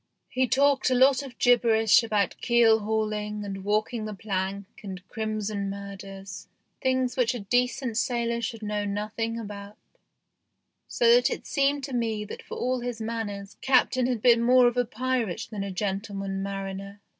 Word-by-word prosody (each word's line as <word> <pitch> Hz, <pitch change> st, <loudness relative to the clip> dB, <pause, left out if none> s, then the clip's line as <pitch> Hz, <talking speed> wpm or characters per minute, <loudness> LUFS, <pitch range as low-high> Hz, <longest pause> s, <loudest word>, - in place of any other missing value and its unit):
He 255 Hz, 0 st, +1 dB
talked 275 Hz, 0 st, +3 dB
a 255 Hz, -, +2 dB
lot 260 Hz, +1 st, +5 dB
of 265 Hz, -4 st, -10 dB
gibberish 230 Hz, -3 st, +5 dB
about 210 Hz, -4 st, 0 dB
keel 235 Hz, -2 st, +4 dB
hauling 210 Hz, -1 st, -2 dB
and 195 Hz, -1 st, -6 dB
walking 215 Hz, +2 st, 0 dB
the 215 Hz, -1 st, -5 dB
plank 195 Hz, 0 st, -3 dB, 0.2 s
and 190 Hz, -2 st, -8 dB
crimson 215 Hz, -2 st, -3 dB
murders 195 Hz, 0 st, -8 dB, 0.3 s
things 260 Hz, -1 st, +1 dB
which 250 Hz, -1 st, +1 dB
a -, -, -4 dB
decent 245 Hz, +3 st, 0 dB
sailor 235 Hz, -1 st, 0 dB
should 225 Hz, -1 st, -4 dB
know 210 Hz, 0 st, -2 dB
nothing 215 Hz, +3 st, -3 dB
about, 205 Hz, -1 st, -8 dB, 1.1 s
so 470 Hz, -1 st, +4 dB
that -, -, +5 dB
it -, -, -5 dB
seemed 280 Hz, 0 st, +1 dB
to 270 Hz, 0 st, -5 dB
me 225 Hz, -3 st, -1 dB
that -, -, -8 dB
for -, -, -8 dB
all 255 Hz, +1 st, 0 dB
his 245 Hz, -1 st, -4 dB
manners 220 Hz, -3 st, -5 dB
Captain 255 Hz, -1 st, +3 dB
had 245 Hz, -4 st, -2 dB
been 235 Hz, -2 st, +6 dB
more 250 Hz, +1 st, +5 dB
of 240 Hz, -, 0 dB
a 245 Hz, 0 st, +2 dB
pirate 245 Hz, -4 st, -2 dB
than 205 Hz, -2 st, -3 dB
a 200 Hz, -, -4 dB
gentleman 195 Hz, 0 st, -3 dB
mariner. 195 Hz, 0 st, -5 dB
220 Hz, 165 wpm, -26 LUFS, 200-245 Hz, 1.1 s, been